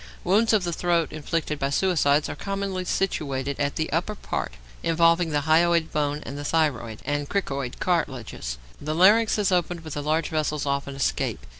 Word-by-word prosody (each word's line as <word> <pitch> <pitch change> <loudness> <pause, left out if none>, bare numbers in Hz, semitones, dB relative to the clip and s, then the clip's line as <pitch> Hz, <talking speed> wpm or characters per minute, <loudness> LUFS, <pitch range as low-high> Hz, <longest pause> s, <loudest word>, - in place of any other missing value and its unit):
Wounds 210 +5 +3
of 215 -4 +3
the 175 -1 -2
throat 170 -1 +1
inflicted 155 0 -2
by 135 - 0
suicides 150 -3 +2
are - - -5
commonly 195 +1 -3
situated 140 -8 -1
at 145 0 0
the 155 - -2
upper 180 +6 0
part, - - -4 0.3
involving 165 +1 +3
the 145 -1 0
hyoid 165 +2 +3
bone 150 0 -1
and 140 +1 -6
the - - -5
thyroid 145 -8 0
and 145 -1 -2
cricoid 140 -10 -2
cartilages. 130 - -2 0.2
The 155 +1 -2
larynx 215 +7 +5
is 205 -2 +1
opened, 175 -1 0
but 155 -2 -7
the 145 - -3
large 155 +2 0
vessels 150 -2 -1
often 140 0 -2
escape. 130 - -1
155 Hz, 175 wpm, -25 LUFS, 145-175 Hz, 0.3 s, larynx